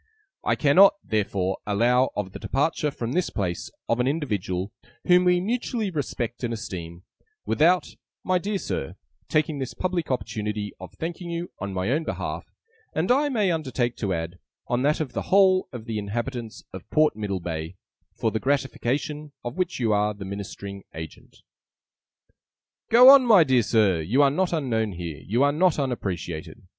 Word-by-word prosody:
'I - - +2
cannot, 180 +8 +6
therefore, 100 -3 -1
allow 120 +5 +3
of 100 -2 -3
the - - -8
departure 150 +3 0
from 120 -4 -5
this 180 +5 0
place 90 -5 -3 0.2
of 115 - +1
an 125 - +2
individual 105 - -2 0.3
whom 180 0 +5
we 180 0 +4
mutually 225 +1 -2
respect 125 -6 -3
and 120 - -1
esteem, 90 -6 -6 0.4
without, 175 +4 +3 0.4
my 185 -1 +2
dear 200 +3 -2
Sir, 70 - -4 0.3
taking 155 -1 +1
this 130 -2 -5
public 180 -3 -2
opportunity 105 -5 -3
of - - -9
thanking 170 +1 -5
you, 170 +1 -4
on 100 0 -4
my 95 +5 -1
own 155 +4 +1
behalf, - - -4 0.5
and, 165 +8 +1
I 290 +3 +3
may 210 -8 +1
undertake 130 -7 -1
to 100 -3 -2
add, 85 +1 -3 0.3
on 120 0 0
that 150 +3 +2
of 140 -5 -4
the - - -2
whole 190 -1 +5
of 120 -3 -8
the 110 -2 -3
Inhabitants 115 +2 -4
of - - -9
Port 155 0 +3
Middlebay, 90 -5 -4 0.4
for 110 - 0
the 110 - -1
gratification 145 +2 -1
of 120 - -4
which 180 -5 -1
you 115 -3 +2
are 105 0 +1
the 100 -1 -8
ministering 100 0 -7
agent. 80 -1 -10 1.5
'Go 245 +3 +9
on, 275 -1 +8
my 215 -8 +7
dear 130 -4 +3
Sir! 105 -7 +2
You 120 - +3
are 140 - +4
not 185 +5 0
unknown 115 - 0
here, 85 -4 -6
you 120 +7 +1
are 145 - +4
not 175 +1 +3
unappreciated. 100 - -4
125 Hz, 170 wpm, -25 LUFS, 100-165 Hz, 1.5 s, Go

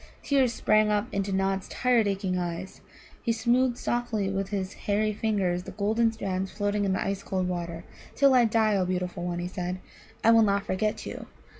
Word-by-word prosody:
Tears 270 -4 +3
sprang 215 -2 +3
up 210 0 +1
into 200 0 -1
Nod's 195 0 0
tired, 245 -4 +2
aching 195 -2 -1
eyes. 175 +1 -4 0.4
He 235 - 0
smoothed 240 +2 +2
softly 235 -6 -1
with 195 0 -2
his 195 -1 -3
hairy 210 +1 0
fingers 200 -5 0
the - - -9
golden 220 +3 +1
strands 190 -3 -3
floating 205 0 -1
in 190 - +1
the 190 - -1
ice 195 0 -2
cold 185 -2 -2
water. 170 -2 -4 0.3
"Till 275 -1 +5
I 245 -2 +6
die, 220 -1 +2
O 190 - +2
beautiful 180 -1 -3
one," 175 -1 -2
he 175 0 -3
said, 180 -1 -4 0.5
"I 230 - +6
will 230 0 +6
not 200 -1 +2
forget 210 +3 -1
you. - - -7
200 Hz, 190 wpm, -27 LUFS, 185-220 Hz, 0.5 s, I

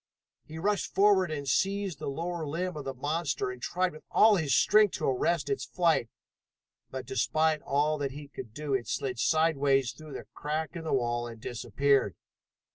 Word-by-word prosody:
He 155 - -9
rushed 205 +4 -1
forward 195 -3 +4
and 145 -3 -4
seized 195 +3 0
the - - -5
lower 170 +4 -3
limb 175 +4 -3
of 150 -2 -6
the 135 - -3
monster 145 -1 -1
and 125 -1 -10
tried 180 +5 0
with 155 - -13
all 215 -1 +6
his 150 -8 +1
strength 210 -1 +5
to - - -3
arrest 145 +5 +1
its 205 - -1
flight, 165 -9 +1 0.8
but 130 -1 -6
despite 155 +5 +1
all 150 +2 +1
that 140 -1 -1
he 145 +2 -9
could 125 -5 -9
do 145 +4 -4
it 130 -3 0
slid 125 -3 -2
sideways 140 -5 +2
through 150 +4 -12
the - - -7
crack 155 +3 -3
in 165 -1 -6
the - - -2
wall 120 -2 0
and 115 -1 -9
disappeared. 130 - 0
150 Hz, 185 wpm, -29 LUFS, 135-170 Hz, 0.8 s, all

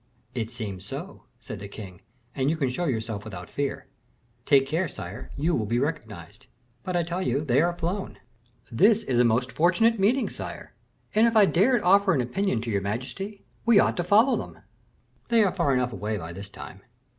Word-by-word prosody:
"It 115 -1 -3
seems 105 -6 -6
so," 140 - -8
said 110 -3 -8
the 100 - -7
king, 95 -3 -10 0.3
"and 135 0 0
you 160 - 0
can 135 -5 0
show 175 +8 -2
yourself 110 -6 -2
without 90 -5 -9
fear." 140 -1 -3 0.6
"Take 135 -1 +5
care, 160 +6 0
sire, - - -8
you 160 +5 +1
will 110 -8 0
be 115 +3 0
recognized." 110 - -4 0.3
"But 185 -1 -4
I 175 - +2
tell 175 +2 -3
you 140 -3 0
they 130 +1 +3
are 175 +1 0
flown." 185 +4 -3 0.5
"This 210 - +4
is 125 - 0
a - - +6
most 120 +2 +1
fortunate 205 +7 +3
meeting, 235 +7 +3
sire; - - -8 0.4
and, 220 +2 +5
if 230 - 0
I 210 - +8
dared 210 +7 +3
offer 195 +1 +5
an 130 - +2
opinion 125 - -1
to 115 0 -4
your 100 -1 0
majesty, 130 - -5 0.2
we 230 -3 +6
ought - - +3
to 175 - 0
follow 215 +9 +4
them." - - -7 0.6
"They 230 -2 +4
are 195 - +1
far 170 -7 +1
enough 125 -2 +1
away 105 +2 -3
by 85 -2 -7
this 100 +2 -8
time." 95 -1 -10
140 Hz, 200 wpm, -26 LUFS, -, 0.6 s, I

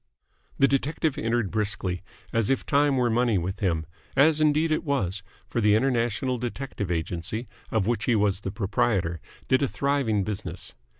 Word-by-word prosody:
The 135 - +5
detective 145 +2 0
entered 115 -3 0
briskly, 100 -4 -1 0.3
as 115 -3 +1
if 135 - +1
time 145 -1 +3
were 120 -2 +2
money 120 -2 +2
with 90 +2 -3
him 85 -5 0 0.3
as 155 +2 +5
indeed 155 +1 +3
it 155 - +1
was, 105 - -1 0.3
for 120 - -1
the 105 -1 +5
International 120 0 +1
Detective 120 -4 -4
Agency, 90 +7 -3 0.2
of 110 -4 +1
which 115 -1 0
he 120 - +3
was 100 -2 +2
the 95 - -3
proprietor, 95 -4 0 0.3
did 130 - +3
a 140 - +2
thriving 135 -8 0
business. 95 -3 -5
115 Hz, 165 wpm, -26 LUFS, 100-135 Hz, 0.3 s, The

